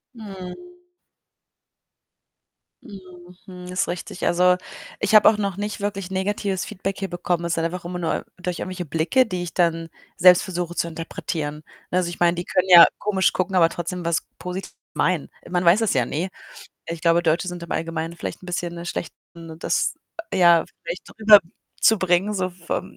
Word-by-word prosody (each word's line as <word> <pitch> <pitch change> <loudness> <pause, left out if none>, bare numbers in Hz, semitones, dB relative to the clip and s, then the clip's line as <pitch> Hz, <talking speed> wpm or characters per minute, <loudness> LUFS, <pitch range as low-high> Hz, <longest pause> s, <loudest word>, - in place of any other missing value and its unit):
Mhm. 220 - -10 2.0
Mhm, 180 -2 -13
hm, 180 -1 -10
ist 185 - 0
richtig. 175 0 -5
Also, 180 +1 +4 0.4
ich 210 - -1
habe 215 - +8
auch 215 - +1
noch 200 -3 -2
nicht 205 0 -4
wirklich 195 -2 -3
negatives 190 0 -1
Feedback 195 -3 -4
hier 195 -1 -4
bekommen. 175 -1 -2
Es 170 -1 0
sind 165 - -1
einfach 175 +1 -4
immer 180 +1 -5
nur 170 - -2
durch 180 -1 -4
irgendwelche 185 -1 -5
Blicke, 165 - +2
die 185 -5 -4
ich 175 - -7
dann 165 -2 +1 0.3
selbst 180 0 +6
versuche 175 -2 -4
zu 170 - 0
interpretieren, 160 -2 -4 0.4
ne? 180 - +1
Also, 180 -2 +1
ich 175 - -8
meine, 175 0 +3
die 175 - -4
können 185 0 0
ja 175 -2 +11
komisch 195 -2 +1
gucken, 190 +1 -1
aber 170 -2 +6
trotzdem 175 +1 -5
was 170 -1 0
Positives 180 +1 -6 0.2
meinen. 165 -1 0 0.2
Man 175 0 0
weiß 180 +6 +5
es 220 - +1
ja 125 -3 +2
nie. 170 +9 -3 0.6
Ich 165 -1 -5
glaube, 170 0 +3
Deutsche 170 +2 +1
sind 175 -1 -6
im 170 - -6
Allgemeinen 165 0 -3
vielleicht - - -6
'n - - -12
bisschen 175 -1 -3
'ne 170 0 -7
schlecht 175 - -5 0.2
ne, 165 -1 -10
das - - 0 0.4
ja 170 -3 +5 0.2
vielleicht - - -6
rüber 215 -1 +9 0.4
zubringen 190 -1 +3
so 185 -1 -1
vom 175 -1 -5
180 Hz, 180 wpm, -23 LUFS, 170-190 Hz, 2.0 s, ja